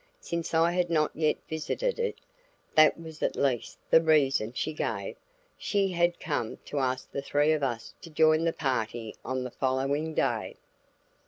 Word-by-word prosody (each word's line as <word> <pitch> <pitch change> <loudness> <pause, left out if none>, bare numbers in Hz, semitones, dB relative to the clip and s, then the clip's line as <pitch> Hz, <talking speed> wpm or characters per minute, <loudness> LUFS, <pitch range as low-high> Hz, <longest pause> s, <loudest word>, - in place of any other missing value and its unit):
Since 170 -1 -3
I 165 +1 +4
had 175 -1 0
not 155 -2 +2
yet 155 -1 +1
visited 465 - -2
it 470 0 -1 0.6
(that 155 +1 +6
was 160 -2 -10
at - - 0
least 130 -4 -1
the 165 - +7
reason 140 -8 +3
she 155 +5 -3
gave) - - -3 0.4
she 200 -2 +1
had 175 0 +1
come 145 -8 -2
to 145 - -3
ask 130 -1 -2
the 140 - -3
three 145 +2 +2
of 155 -1 +1
us 120 -4 -3
to 170 - -10
join 155 0 +4
the 165 - +2
party 115 -6 -2
on 130 0 -2
the 125 - -5
following 140 +5 -1
day. - - 0
155 Hz, 170 wpm, -28 LUFS, 130-165 Hz, 0.6 s, the